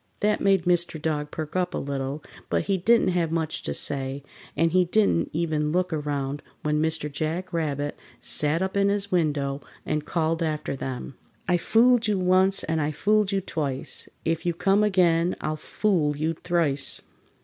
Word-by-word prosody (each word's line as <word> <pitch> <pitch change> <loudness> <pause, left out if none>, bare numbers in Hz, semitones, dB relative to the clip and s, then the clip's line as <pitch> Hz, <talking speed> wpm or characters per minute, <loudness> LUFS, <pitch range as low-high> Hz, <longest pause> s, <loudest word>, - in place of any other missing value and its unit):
That 210 0 +2
made 195 -3 +3
Mr. 175 -2 +1
Dog 150 -1 -2
perk 155 +1 -6
up 180 -1 0
a - - -1
little, 140 +1 -3 0.3
but - - +1
he 200 - 0
didn't 230 +5 +4
have 175 -3 0
much 160 -1 -1
to - - -4
say, 135 0 0 0.3
and 165 0 +3
he 180 +1 +4
didn't 170 - +2
even 155 -2 0
look 180 0 0
around 145 -2 -2 0.2
when 150 0 +1
Mr. 160 -1 -1
Jack 160 +5 -3
Rabbit 145 -3 -1 0.2
sat 150 +4 0
up 190 +1 -3
in 200 0 +3
his 200 0 -1
window 145 -5 0 0.2
and 150 -1 -1
called 165 +1 -1
after 155 -3 -2
them: 130 0 -6 0.3
"I 180 - +3
fooled 230 +5 +4
you 210 -2 +1
once 185 +1 +3
and 160 0 -1
I 145 - 0
fooled 210 +5 +2
you 195 -1 0
twice, 145 -7 -2 0.2
If 165 0 0
you 175 -1 -1
come 195 +4 +3
again 180 -4 +3
I'll 155 - -2
fool 155 -2 0
you 160 +2 0
thrice!" 160 -5 0
165 Hz, 175 wpm, -25 LUFS, 150-185 Hz, 0.3 s, didn't